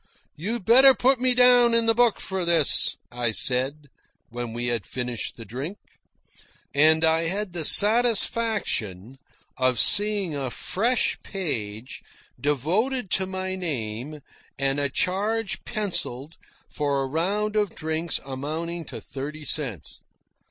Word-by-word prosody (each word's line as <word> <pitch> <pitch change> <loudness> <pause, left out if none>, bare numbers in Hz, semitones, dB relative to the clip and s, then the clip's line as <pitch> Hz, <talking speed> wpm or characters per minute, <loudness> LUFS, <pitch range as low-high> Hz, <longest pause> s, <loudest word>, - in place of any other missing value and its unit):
"You'd 205 +6 -5
better 260 +4 +6
put 265 0 +1
me 255 -1 +2
down 245 -1 +4
in 230 0 +2
the 225 - +2
book 235 -1 +1
for 190 -1 -4
this," 170 -4 +3
I 120 -1 -2
said, 130 +6 +4 0.4
when 120 0 -7
we 120 +1 -5
had 120 -4 -2
finished 125 +2 -6
the 115 - -10
drink. 135 - -7 1.0
And 160 +3 +3
I 160 +1 +1
had 195 +1 -4
the 170 -2 -4
satisfaction 205 - +4 0.4
of 130 -2 0
seeing 205 -6 +1
a 135 -2 -4
fresh 230 - -2
page 120 - -6 0.4
devoted 185 - -2
to 190 -1 0
my 190 0 -5
name 145 -5 -5 0.4
and 135 +1 -1
a 140 -1 -1
charge 205 +6 -2
pencilled 165 - -4 0.3
for 140 -2 -2
a - - -4
round 200 +9 -2
of 210 -2 -1
drinks 160 0 -3
amounting 155 +5 -6
to - - -9
thirty 145 +3 -8
cents. 125 - -3
160 Hz, 130 wpm, -23 LUFS, 135-210 Hz, 1.0 s, better